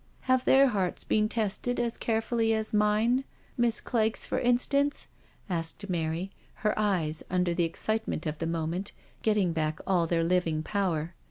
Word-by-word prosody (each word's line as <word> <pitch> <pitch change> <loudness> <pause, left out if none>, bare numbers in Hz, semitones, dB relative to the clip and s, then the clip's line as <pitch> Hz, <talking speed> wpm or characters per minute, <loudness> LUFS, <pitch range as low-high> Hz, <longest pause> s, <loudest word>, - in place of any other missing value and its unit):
'* - - -34
Have 255 0 +2
their 270 0 +6
hearts 195 -6 -1
been 215 0 +1
tested 225 +3 -1
as 235 -1 0
carefully 225 0 +1
as 220 0 -3
mine? 215 +5 +3 0.3
Miss 240 -1 +1
Clegg's^ 220 -2 0
for - - -1
instance? 280 +4 +1 0.4
asked 170 +2 -3
Mary, 170 +2 -2 0.3
her 210 - +4
eyes, 175 -7 0
under 180 -1 +1
the 170 0 +1
excitement 215 0 -2
of 155 -1 -3
the 165 - -2
moment, 165 +4 -2 0.3
getting 205 -6 +2
back 155 -1 -1
all 175 -3 +2
their 165 0 +1
living 165 -3 +1
power. 175 -5 -1
200 Hz, 160 wpm, -29 LUFS, 165-225 Hz, 0.4 s, their